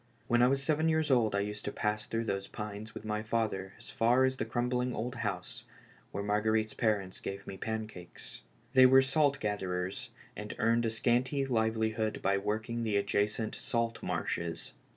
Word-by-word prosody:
When 120 Hz, 0 st, +3 dB
I 125 Hz, -, +7 dB
was 135 Hz, +1 st, +1 dB
seven 155 Hz, +2 st, +2 dB
years 160 Hz, -2 st, +2 dB
old 115 Hz, -5 st, +3 dB
I 100 Hz, -, +2 dB
used 105 Hz, +1 st, -4 dB
to -, -, -2 dB
pass 105 Hz, 0 st, -1 dB
through 115 Hz, 0 st, -1 dB
those 100 Hz, -3 st, -2 dB
pines 105 Hz, +1 st, -7 dB
with -, -, -7 dB
my 105 Hz, 0 st, -1 dB
father 110 Hz, -4 st, -1 dB
as -, -, -10 dB
far 120 Hz, +3 st, +4 dB
as 130 Hz, 0 st, -1 dB
a -, -, +1 dB
crumbling 125 Hz, 0 st, -1 dB
old 120 Hz, +3 st, -3 dB
house, 100 Hz, -7 st, -4 dB, 0.5 s
where 100 Hz, -, -3 dB
Marguerite's 110 Hz, +1 st, +1 dB
parents 105 Hz, -5 st, 0 dB
gave 100 Hz, +1 st, -6 dB
me 95 Hz, -, -6 dB
pancakes. 110 Hz, -4 st, -6 dB, 0.3 s
Tliey 130 Hz, 0 st, +8 dB
were 130 Hz, +1 st, +7 dB
salt 140 Hz, +1 st, +2 dB
gatherers, 95 Hz, -4 st, -2 dB, 0.3 s
and -, -, -6 dB
earned 115 Hz, 0 st, +2 dB
a -, -, +1 dB
scanty 125 Hz, +4 st, +1 dB
livelihood 110 Hz, -2 st, 0 dB
by 100 Hz, +1 st, +3 dB
working 110 Hz, +3 st, -2 dB
the 110 Hz, -3 st, +1 dB
adjacent 105 Hz, +2 st, 0 dB
salt 115 Hz, -1 st, -2 dB
marshes. 85 Hz, -1 st, -3 dB
110 Hz, 175 wpm, -32 LUFS, 105-120 Hz, 0.5 s, Tliey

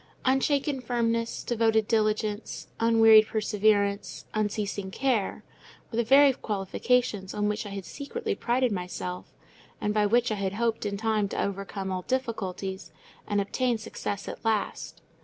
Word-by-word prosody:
Unshaken 270 Hz, +1 st, +1 dB
firmness, 230 Hz, -1 st, -1 dB
devoted 225 Hz, -2 st, +2 dB
diligence, 215 Hz, -1 st, 0 dB
unwearied 225 Hz, -1 st, +6 dB
perseverance, 205 Hz, -3 st, +1 dB
unceasing 205 Hz, -2 st, -2 dB
care, 240 Hz, -1 st, -1 dB, 0.5 s
were 225 Hz, -, -4 dB
the 235 Hz, -, +3 dB
very 275 Hz, +3 st, +6 dB
qualifications 210 Hz, -1 st, -1 dB
on 210 Hz, 0 st, 0 dB
which 210 Hz, +1 st, -2 dB
I -, -, -6 dB
had 195 Hz, -2 st, -6 dB
secretly 435 Hz, +10 st, -4 dB
prided 250 Hz, -, +1 dB
myself; 180 Hz, -1 st, -4 dB, 0.5 s
and 210 Hz, -, -1 dB
by 210 Hz, -1 st, +3 dB
which 240 Hz, +2 st, +2 dB
I -, -, +1 dB
had 190 Hz, 0 st, -1 dB
hoped 225 Hz, 0 st, -1 dB
in 200 Hz, 0 st, -3 dB
time 215 Hz, -1 st, 0 dB
to -, -, -1 dB
overcome 195 Hz, 0 st, -4 dB
all 185 Hz, -1 st, -2 dB
difficulties, 195 Hz, -7 st, -3 dB, 0.4 s
and 205 Hz, -, +1 dB
obtain 240 Hz, +4 st, 0 dB
success 205 Hz, -2 st, -5 dB
at -, -, -7 dB
last. 220 Hz, -2 st, -2 dB
215 Hz, 140 wpm, -27 LUFS, 200-235 Hz, 0.5 s, unwearied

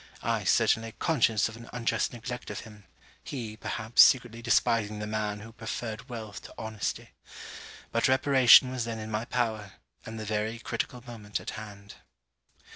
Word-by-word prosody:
I, -, -, 0 dB
certainly 115 Hz, 0 st, +2 dB
conscious 115 Hz, -9 st, +2 dB
of 110 Hz, -, -9 dB
an 115 Hz, 0 st, -12 dB
unjust 120 Hz, -1 st, 0 dB
neglect 125 Hz, +1 st, -6 dB
of -, -, -5 dB
him: 105 Hz, -2 st, -14 dB, 0.4 s
he, 115 Hz, -6 st, -6 dB
perhaps 110 Hz, +1 st, +2 dB
secretly 120 Hz, -3 st, +4 dB
despising 115 Hz, -2 st, +2 dB
the 105 Hz, -, -4 dB
man 105 Hz, -1 st, -2 dB
who 115 Hz, +2 st, -10 dB
preferred 115 Hz, +1 st, -6 dB
wealth 110 Hz, -4 st, -7 dB
to -, -, -11 dB
honesty. 110 Hz, -2 st, -4 dB, 0.8 s
But 115 Hz, -, +2 dB
reparation 130 Hz, -1 st, +6 dB
was 125 Hz, -2 st, -2 dB
then 115 Hz, -1 st, -4 dB
in 110 Hz, 0 st, -6 dB
my 110 Hz, +2 st, -2 dB
power; 110 Hz, -5 st, -2 dB, 0.3 s
and 110 Hz, 0 st, -7 dB
the 110 Hz, -, -5 dB
very 110 Hz, +2 st, -2 dB
critical 120 Hz, +1 st, -4 dB
moment 105 Hz, -4 st, -5 dB
at -, -, -6 dB
hand. 100 Hz, -2 st, -10 dB
115 Hz, 160 wpm, -28 LUFS, 110-120 Hz, 0.8 s, reparation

